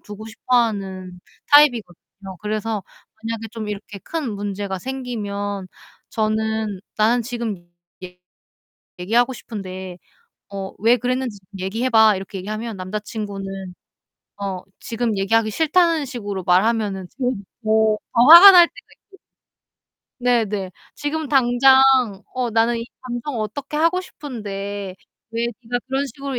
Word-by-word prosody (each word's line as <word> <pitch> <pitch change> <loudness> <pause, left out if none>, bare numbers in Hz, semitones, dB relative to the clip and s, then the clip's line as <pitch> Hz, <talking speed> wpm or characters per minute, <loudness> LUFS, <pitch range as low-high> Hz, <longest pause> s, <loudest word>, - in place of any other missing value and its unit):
두고 210 +1 -10
싶어 245 +3 -1
하는 190 -5 -2 0.3
타입이거든요. 205 - +2
그래서 215 -1 -3 0.4
만약에 225 0 -4
좀 220 -2 -6
이렇게 205 0 -7
큰 305 - -4
문제가 200 -1 -4
생기면 205 -6 -4 0.4
저는 220 -2 -1 0.2
"나는 230 +3 +3
지금 230 -6 -4 0.4
얘 180 0 -10 0.8
얘기하고 235 +8 +2
싶은데 190 -5 -8 0.5
어 195 -1 -6
왜 230 +4 +4
그랬는지 250 -2 -2
좀 185 - -34
얘기해 225 +7 -2
봐." 220 -3 +6
이렇게 195 0 -7
얘기하면 215 +4 -5
남자친구는 195 -1 -6 0.7
어 190 -2 -3 0.2
지금 230 -4 -2
얘기하기 215 +3 +2
싫다는 325 - +2
식으로 205 -8 -5
말하면은 195 0 +1
그게 255 -1 0 0.3
더 220 0 +3 0.2
더 235 - +5
화가 345 +5 +12
날 350 -2 +8
때가 - - -17 0.2
있고 390 - -19 1.1
네 245 -2 +3
네. 195 -3 -4 0.3
"지금 300 +1 -3
당장 265 0 +5 0.5
어 250 -2 -1
나는 230 +1 +2
이 230 - -4 0.2
감정을 240 0 -4
어떻게 280 +8 -4
하고 335 +3 +2
싶은데 205 - -6 0.4
왜 230 +1 -1 0.2
니가 245 +2 -2
그런 270 +1 -1
식으로 275 +1 -5
220 Hz, 280 characters per minute, -21 LUFS, 200-250 Hz, 1.1 s, 화가